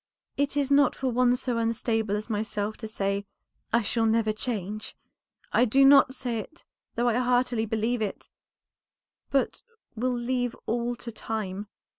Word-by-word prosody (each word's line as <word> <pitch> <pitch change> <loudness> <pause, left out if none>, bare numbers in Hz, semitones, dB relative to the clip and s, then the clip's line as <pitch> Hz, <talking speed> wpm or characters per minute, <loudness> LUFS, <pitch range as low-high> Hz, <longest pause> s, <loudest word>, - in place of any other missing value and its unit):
"It 285 0 0
is 280 -1 +1
not 280 -1 +5
for 265 - -1
one 250 0 +3
so 250 -2 -2
unstable 225 -2 0
as 210 +1 -4
myself 210 -1 -2
to 220 - -6
say, 200 -1 -2 0.4
'I 235 0 +3
shall 225 +2 +1
never 220 -1 +2
change.' 215 -2 -4 0.6
I 245 - +5
do 270 +4 +5
not 275 -1 +7
say 240 -4 -2
it, 315 +10 -10 0.3
though 240 +1 +1
I 240 - +3
heartily 245 -2 +1
believe 225 +2 0
it, 205 -2 -4 1.0
but 275 -1 0 0.3
will 250 +2 0
leave 245 0 -1
all 240 +1 -1
to 235 0 -7
time. 210 -2 -4
235 Hz, 155 wpm, -27 LUFS, 215-250 Hz, 1.0 s, not